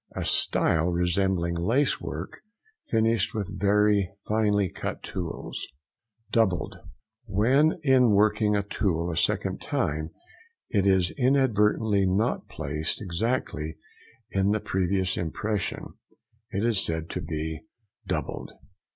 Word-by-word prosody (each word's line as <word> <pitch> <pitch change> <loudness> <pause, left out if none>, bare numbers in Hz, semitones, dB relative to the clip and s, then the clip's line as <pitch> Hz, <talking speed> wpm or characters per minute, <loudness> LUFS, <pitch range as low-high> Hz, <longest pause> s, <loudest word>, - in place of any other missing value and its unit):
A - - -3
style 80 +1 +3
resembling 90 0 +1
lace 115 +12 +1
work, - - -6 0.5
finished 115 -2 +1
with 100 -2 -4
very 100 -1 +3 0.2
finely 105 -2 +2
cut - - -5
tools. 90 -3 -5 0.6
DOUBLED.—When 110 - 0
in 130 -4 +5
working 105 0 +3
a 100 - +1
tool 90 -4 -1
a - - -4
second - - 0
time 80 +2 -1 0.6
it 100 -2 +2
is 95 -2 +3
inadvertently 110 -6 +3
not 100 +6 0
placed 75 +3 -3
exactly 90 -5 -2 0.5
in 95 0 +2
the 105 +1 +2
previous 95 -1 0
impression, 100 +4 -2 0.6
it 100 +2 -1
is 115 -4 +2
said 80 0 -2
to 90 - -3
be 80 -1 -4 0.5
"doubled." - - -3
100 Hz, 110 wpm, -27 LUFS, 90-110 Hz, 0.6 s, in